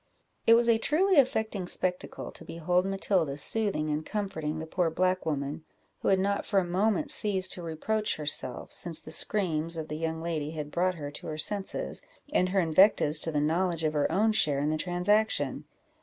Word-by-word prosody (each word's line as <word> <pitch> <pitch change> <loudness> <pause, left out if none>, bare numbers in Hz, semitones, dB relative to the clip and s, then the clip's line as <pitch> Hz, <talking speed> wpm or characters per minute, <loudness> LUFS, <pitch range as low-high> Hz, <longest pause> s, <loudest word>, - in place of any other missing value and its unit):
It 230 - +8
was 235 0 +3
a 230 -1 +4
truly 360 - +2
affecting 220 -7 0
spectacle 180 0 -2
to - - -10
behold 180 +3 0
Matilda 185 -7 0
soothing 190 -4 0
and 150 +1 -1
comforting 160 -6 -3
the 160 - -5
poor 170 +1 0
black 185 +2 0
woman, 145 0 -3 0.4
who - - -3
had 195 - +4
not 200 +2 0
for 200 - +2
a - - 0
moment 190 +3 0
ceased 190 -3 +1
to 180 - -3
reproach 205 +7 -1
herself, 145 -4 -2
since 170 -3 0
the 155 - -8
screams 165 -2 0
of 160 -1 -5
the 150 - -4
young 160 0 -2
lady 160 -3 -3
had 150 -2 -5
brought 185 +3 +1
her 145 -3 -6
to - - -9
her 155 - -4
senses, 205 - -4 0.3
and 185 -10 +2
her 195 +1 +1
invectives 165 -2 +4
to 165 - -2
the 150 - 0
knowledge 165 +2 0
of 155 -1 +1
her 150 0 +1
own 210 +6 +3
share 150 -9 +3
in 150 +2 0
the - - 0
transaction. 185 +6 +1
175 Hz, 195 wpm, -28 LUFS, 155-200 Hz, 0.4 s, It